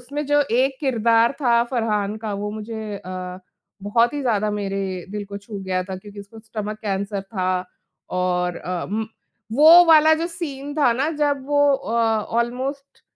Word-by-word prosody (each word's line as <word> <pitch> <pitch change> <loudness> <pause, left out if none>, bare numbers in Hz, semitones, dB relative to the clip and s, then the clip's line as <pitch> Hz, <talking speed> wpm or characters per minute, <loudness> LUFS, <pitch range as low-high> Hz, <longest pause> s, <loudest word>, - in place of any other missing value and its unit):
उसमें 285 +4 -5
जो 290 +1 +3
एक 260 +3 +2
किरदार 230 -3 +3
था 235 -3 +4
फ़रहान 215 -4 -1
का 210 - -2
वो 205 +1 -3
मुझे 215 -1 -6
अ, 185 0 -6 0.4
बहुत 230 +6 +2
ही 290 - -2
ज़्यादा 215 -4 +1
मेरे 195 -1 -2 0.3
दिल 205 0 -4
को 200 0 -7
छू 200 0 -8
गया 185 -1 -1
था, 190 -1 -6
क्योंकि 205 +1 -11
उसको 200 +3 -13
स्टमक 215 -1 -6
कैंसर 200 0 -2
था 185 -2 -2 0.5
और 180 -1 0
अ, 180 -1 -4
म 220 +1 -2 0.5
वो 320 +7 +8
वाला 315 -1 +7
जो 325 +2 -2
सीन 290 -5 -6
था 280 -6 +4
ना 270 +6 0
जब 285 -3 0
वो 290 0 +1 0.2
अ, 225 - -6 0.5
ऑलमोस्ट 260 +4 -3
220 Hz, 170 wpm, -22 LUFS, 200-270 Hz, 0.5 s, वो